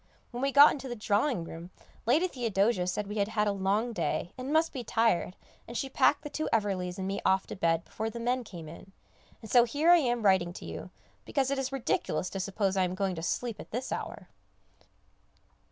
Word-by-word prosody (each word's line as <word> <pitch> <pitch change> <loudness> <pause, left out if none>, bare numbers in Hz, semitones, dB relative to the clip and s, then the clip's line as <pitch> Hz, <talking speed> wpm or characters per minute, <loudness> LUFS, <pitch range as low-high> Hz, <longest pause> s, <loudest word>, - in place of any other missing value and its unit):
when 245 0 -5
we 275 +1 +1
got 285 +2 +9
into 270 -2 -5
the 240 - -4
drawing 210 - 0
room, 165 +1 -9 0.4
Lady 310 +10 +4
Theodosia 220 - 0
said 205 +3 -1
we 210 +2 -6
had 200 - +2
had 210 -1 0
a - - +2
long 200 +4 0
day, 180 -4 -2
and 255 +2 -5
must 320 +1 +2
be 255 -4 -4
tired, 225 -6 +1 0.3
and 235 - -5
she 270 - -2
packed 285 +2 +3
the 295 - -5
two 310 - -2
Everleighs 190 -4 0
and 190 -1 -3
me 195 +1 -2
off 190 0 +2
to - - -7
bed 165 -3 +1
before 220 +1 -4
the 235 - -7
men 245 +2 0
came 175 -7 -9
in, 170 +4 -12 0.5
and 220 - -9
so 245 -1 +7
here 290 +8 +3
I 350 - +9
am 240 -7 0
writing 190 -3 +3
to - - -9
you, - - -7 0.3
because 275 -2 0
it 275 - 0
is 270 0 -2
ridiculous 230 -8 -1
to 195 - -4
suppose 195 0 -1
I 190 - +3
am 180 0 -1
going 195 -1 -1
to 165 - -5
sleep 225 +5 -2
at - - -9
this 250 +4 -4
hour. - - -5
220 Hz, 220 wpm, -29 LUFS, 190-255 Hz, 0.5 s, got